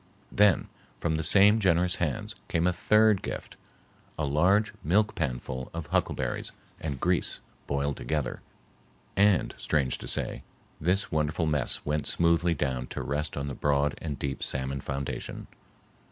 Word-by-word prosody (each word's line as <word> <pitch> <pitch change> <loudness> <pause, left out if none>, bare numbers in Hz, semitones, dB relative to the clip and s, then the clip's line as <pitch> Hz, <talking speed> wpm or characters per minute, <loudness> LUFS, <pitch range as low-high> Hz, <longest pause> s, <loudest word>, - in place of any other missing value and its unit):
Then, 100 -3 +4 0.3
from 80 -2 0
the 80 - -2
same 105 +5 +6
generous 90 -2 +3
hands, 80 -6 -2
came 85 +1 +1
a 90 - +3
third 105 +1 +4
gift,—a 80 - -8
large 90 +10 +3
milk 105 +7 +2
panful 65 -3 -3
of 85 -2 -4
huckleberries - - -1 0.3
and 70 -5 -4
grease 90 +2 +1 0.3
boiled 70 0 -1
together,—and, 90 +7 -2
strange 70 -5 0
to - - -8
say, - - -2 0.4
this 90 +5 +1
wonderful 75 +2 0
mess 75 -4 +1
went 75 0 0
smoothly 85 0 +2
down 65 -4 -2
to - - -5
rest 75 +2 -2
on 70 0 -2
the 70 - -3
broad 70 +2 +1
and 75 -4 -4
deep 70 -1 -3
salmon 65 +1 -2
foundation. 70 0 -4
75 Hz, 140 wpm, -28 LUFS, 70-90 Hz, 0.4 s, same